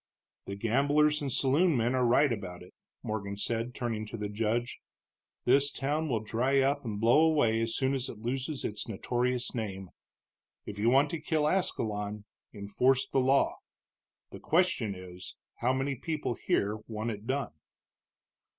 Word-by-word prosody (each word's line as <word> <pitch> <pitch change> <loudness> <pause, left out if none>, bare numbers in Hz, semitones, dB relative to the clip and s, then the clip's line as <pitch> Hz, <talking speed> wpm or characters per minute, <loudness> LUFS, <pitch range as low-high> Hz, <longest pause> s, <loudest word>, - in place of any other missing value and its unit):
"The 100 - -4
gamblers 145 +8 +2
and 140 -2 -2
saloon 145 +5 +3
men 120 +2 +1
are 130 -1 +2
right 125 +2 +4
about 90 -5 -7
it," 90 - -16 0.3
Morgan 100 -2 -4
said, 115 +3 -3
turning 110 -3 -3
to 115 - -6
the 105 -1 -4
judge; 115 +3 -1 0.7
"this 140 +3 +4
town 145 +3 -2
will 115 -4 0
dry 125 +6 +1
up 140 +2 +1
and 105 -4 -4
blow 115 +6 +5
away 145 -9 +3
as 115 0 -1
soon 135 0 +1
as 135 -1 -2
it - - -8
loses 130 +5 -3
its 105 - -3
notorious 120 +3 -1
name. 95 -5 -5 0.7
If 105 0 -7
you 110 +3 +3
want 140 +3 +4
to 165 - -4
kill 155 -1 +1
Ascalon, 105 - -1 0.3
enforce 125 +6 +1
the 135 - +2
law. 135 +2 +3 0.7
The - - -9
question 155 - +1
is, 90 -1 -10 0.2
how 125 - +1
many 135 +2 0
people 150 0 -3
here 105 -1 0
want 110 +1 -3
it 105 +1 -8
done?" 135 - -2
120 Hz, 160 wpm, -30 LUFS, 105-140 Hz, 0.7 s, blow